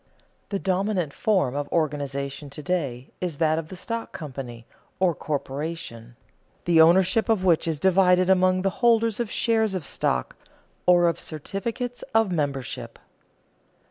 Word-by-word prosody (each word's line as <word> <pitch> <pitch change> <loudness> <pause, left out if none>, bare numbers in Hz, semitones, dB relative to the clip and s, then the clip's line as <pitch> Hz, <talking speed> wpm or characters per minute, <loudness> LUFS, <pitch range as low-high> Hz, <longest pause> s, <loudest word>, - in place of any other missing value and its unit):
The 200 - -1
dominant 190 -4 -1
form 185 - +1
of 145 0 -3
organization 145 -2 -2
to 145 +2 -9
day 140 -9 -2
is 175 -5 -3
that 160 0 +2
of 160 - -6
the 185 - -9
stock 230 +5 -5
company, 130 -6 -7 0.3
or 185 -2 +3
corporation, 140 -5 -5 0.5
the 170 -2 +5
ownership 185 +7 +4
of 205 -4 +2
which 170 -2 +3
is 160 -3 -1
divided 185 0 +4
among 185 0 +3
the 195 - +1
holders 230 -2 +3
of 235 -3 -1
shares 220 -4 +1
of 175 -6 -4
stock, 65 - -1 0.5
or 175 -1 +6
of 170 - 0
certificates 225 - -5
of 225 -4 +4
membership. 140 -7 -3
175 Hz, 140 wpm, -25 LUFS, 145-190 Hz, 0.5 s, or